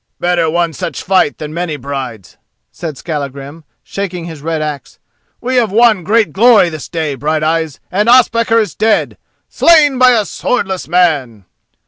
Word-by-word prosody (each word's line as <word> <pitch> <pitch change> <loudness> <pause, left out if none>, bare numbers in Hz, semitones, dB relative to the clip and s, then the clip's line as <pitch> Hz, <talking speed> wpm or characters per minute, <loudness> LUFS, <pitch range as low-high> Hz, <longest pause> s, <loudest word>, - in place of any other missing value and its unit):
"Better 175 -2 +1
one 170 0 -1
such - - -5
fight 185 -5 +1
than 150 0 -7
many 170 -2 -3
brides," 130 -8 -7 0.4
said 160 -5 -7
Skallagrim, 145 0 -6 0.2
shaking 185 -4 -5
his 160 -4 -9
red 160 +1 -2
axe. 150 -3 -6 0.4
"We 255 +2 -2
have 230 -5 +1
won 220 -3 +3
great 210 -3 +1
glory 220 -4 +5
this 155 -2 -8
day, 160 -4 -2
Brighteyes, 155 +1 -1
and 210 +4 +1
Ospakar 230 -2 +4
is 215 - -2
dead—slain 290 +6 +1
by 255 -1 +6
a 220 -3 +1
swordless 190 -6 -3
man!" 145 - 0
170 Hz, 145 wpm, -14 LUFS, 150-215 Hz, 0.4 s, by